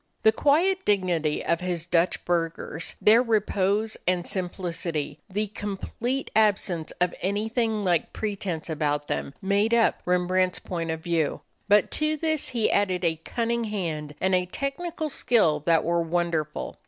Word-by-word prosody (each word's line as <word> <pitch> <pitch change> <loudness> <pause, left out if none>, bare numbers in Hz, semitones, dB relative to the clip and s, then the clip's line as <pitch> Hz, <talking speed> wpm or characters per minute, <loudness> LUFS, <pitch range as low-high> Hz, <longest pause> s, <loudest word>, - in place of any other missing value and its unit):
The 220 - +7
quiet 345 +10 +2
dignity 175 -7 +1
of 170 - +1
his 175 -2 -2
Dutch 175 0 +1
burghers, 165 -1 -2
their 225 +3 +6
repose 215 -2 +1
and 180 -1 +1
simplicity, 170 -5 -3
the 210 +3 -1
complete 220 +6 -4
absence 200 -6 +2
of 180 0 +2
anything 220 +2 0
like 175 -4 +1
pretense 195 -6 -3
about 150 -2 -1
them, 140 - -3
made 200 +4 +2
up 230 -1 +3
Rembrandt's 180 +1 +2
point 170 -2 -4
of 160 0 -3
view; 165 -3 0 0.3
but 205 -1 +4
to 305 0 +1
this 315 -1 0
he 230 -4 +1
added 185 -3 +1
a 160 -1 +1
cunning 235 +2 -1
hand 160 -8 -3
and 190 0 +1
a 180 0 +2
technical 310 - -3
skill 220 - +2
that 165 -1 +4
were 170 0 +1
wonderful. 165 -2 -2
185 Hz, 145 wpm, -26 LUFS, 170-220 Hz, 0.3 s, The